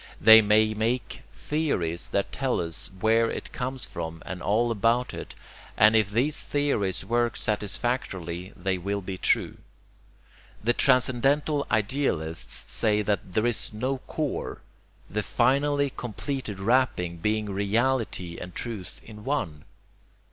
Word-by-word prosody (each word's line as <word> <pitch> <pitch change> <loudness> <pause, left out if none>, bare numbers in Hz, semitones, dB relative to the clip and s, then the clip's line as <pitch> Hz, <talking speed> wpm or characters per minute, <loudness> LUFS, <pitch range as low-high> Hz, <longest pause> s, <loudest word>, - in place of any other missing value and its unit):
They 110 +1 +9
may 110 +1 +3
make 115 +1 -2
theories 95 - -2
that 100 - -1
tell 135 -2 -1
us 85 -2 -3
where 115 +1 +3
it - - -6
comes 130 0 -4
from 80 -1 -6
and 90 -1 -6
all 115 +3 +2
about 115 +3 +1
it; - - -7 0.4
and 110 +1 +6
if 110 -2 +3
these 125 +9 +1
theories 140 -10 0
work 120 0 +1
satisfactorily 95 -4 -3
they 95 -1 -1
will 100 +3 -2
be 95 0 -6
true. - - +1 1.1
The 120 +2 +3
transcendental 135 +3 +2
idealists 105 - -1
say 105 -1 +2
there 100 +1 0
is 120 -2 0
no 130 +5 -2
core, 150 -3 -3 0.5
the 105 +3 -2
finally 140 +4 +2
completed 120 -2 -4
wrapping 95 -6 +1
being 105 +5 0
reality 100 -3 0
and 90 0 -8
truth 105 -7 -6
in 105 -1 -11
one. 85 - -2
110 Hz, 125 wpm, -26 LUFS, 95-130 Hz, 1.1 s, They